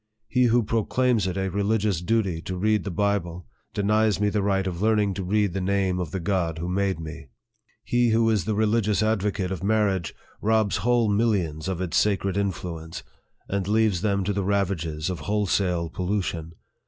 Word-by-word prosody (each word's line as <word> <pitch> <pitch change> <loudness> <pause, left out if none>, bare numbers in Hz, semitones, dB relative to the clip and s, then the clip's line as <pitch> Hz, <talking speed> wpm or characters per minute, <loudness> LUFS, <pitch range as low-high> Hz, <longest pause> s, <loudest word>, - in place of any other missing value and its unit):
He 125 +2 +2
who 120 0 +3
proclaims 115 0 +1
it 90 0 -3
a 95 0 0
religious 100 -2 0
duty 95 -4 0
to 90 +1 -5
read 105 +2 +1
the - - -2
Bible 90 -3 -1 0.3
denies 105 0 +2
me 105 0 +2
the 105 0 0
right 95 -1 +1
of 90 -2 -4
learning 105 -2 +2
to 95 +1 -4
read 100 0 +1
the 95 - -2
name 95 -1 0
of 90 -4 -3
the 95 - -3
God 85 -3 -1
who 85 +2 -4
made 95 -1 0
me. 80 -2 -8 0.6
He 120 -1 +2
who 115 0 +3
is 105 -6 +1
the 110 - -1
religious 110 0 +2
advocate 100 -3 0
of 95 - -4
marriage 100 -4 +1 0.3
robs 110 -1 +2
whole 120 -1 +2
mil 105 +3 +2
lions 85 -7 -1
of 95 -2 -2
its 90 -4 -1
sacred 100 -2 +1
influence, 85 -5 -4 0.4
and 100 -1 -2
leaves 105 -4 +2
them 100 -2 +1
to 100 +2 -1
the 100 0 -1
ravages 90 -6 -1
of 90 - -5
wholesale 95 -4 0
pollution. 90 -4 -2
100 Hz, 185 wpm, -25 LUFS, 90-105 Hz, 0.6 s, who